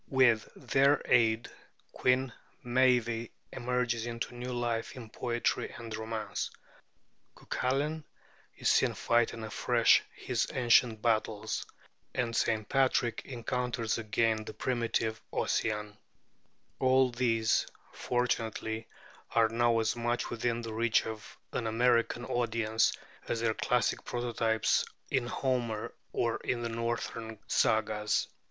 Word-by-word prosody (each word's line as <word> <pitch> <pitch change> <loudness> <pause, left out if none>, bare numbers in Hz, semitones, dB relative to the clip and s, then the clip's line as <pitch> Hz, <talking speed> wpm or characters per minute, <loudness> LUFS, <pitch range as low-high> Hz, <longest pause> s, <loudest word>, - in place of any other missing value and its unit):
With 125 -5 +3
their 140 +1 +3
aid 115 -1 +3 0.4
Queen 125 -1 +1 0.3
Meave 120 -2 +2 0.2
emerges 120 -2 -1
into 115 +1 -4
new 125 +1 -5
life 120 -2 -2
in 115 -4 -9
poetry 120 -1 -1
and 115 -2 -6
romance; 110 -1 -3 0.9
Cuculain 145 +5 -1 0.5
is - - -2
seen - - +3
fighting 120 -1 +1
afresh 110 -2 +4
his - - -1
ancient 120 -3 +4
battles; 110 -1 0 0.5
and 115 -2 -1
St. 110 -2 +1
Patrick 130 -3 +2
encounters 120 -2 -2
again 110 0 +1
the - - -9
primitive 115 -3 -1
Ossian: 105 -1 -1 0.8
all 130 0 +4
these, 115 -2 +2 0.3
fortunately, 115 -2 -1 0.5
are 115 -1 +5
now 115 0 +2
as 110 - +1
much 120 0 -1
within 120 0 -1
the 115 -1 -5
reach 115 +1 +2
of 110 -1 -7
an 115 - -2
American 120 +1 +2
audience 115 -2 +1 0.4
as 115 - -1
their 115 -1 +2
classic 125 +2 0
prototypes 115 -2 +1 0.3
in 130 -3 +1
Homer 120 -4 -1 0.2
or 115 -1 0
in 120 -2 -2
the 115 - -2
northern 115 -1 -3
sagas. 105 -1 +1
115 Hz, 115 wpm, -31 LUFS, 110-125 Hz, 0.9 s, are